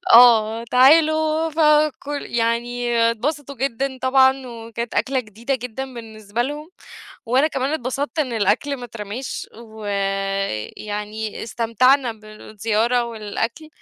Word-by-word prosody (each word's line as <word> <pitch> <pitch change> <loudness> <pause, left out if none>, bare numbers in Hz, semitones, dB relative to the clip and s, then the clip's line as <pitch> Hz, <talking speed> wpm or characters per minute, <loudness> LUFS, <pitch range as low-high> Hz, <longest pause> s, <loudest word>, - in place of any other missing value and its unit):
آه، 230 -1 +6
تعالوا." 315 +4 +4
فكل 300 -2 +2
يعني 240 +1 -1
اتبسطوا 280 +4 -3
جدًا 265 +1 -2
طبعًا 265 0 +4
وكانت 230 0 -6
أكلة 265 -1 +1
جديدة 230 +4 -4
جدًا 255 +1 -6
بالنسبة 220 -1 -4
لهم. 295 +5 -5 0.6
وأنا 260 +6 +3
كمان 270 -1 -2
اتبسطت 280 +3 -3
إن 255 -5 -1
الأكل 225 +6 +1
ما 245 - -8
اترماش، 225 +2 -6
ويعني 205 - -3
استمتعنا 235 +3 +2
بالزيارة 215 +2 -1
والأكل 230 +5 -4
240 Hz, 105 wpm, -21 LUFS, 220-270 Hz, 0.6 s, آه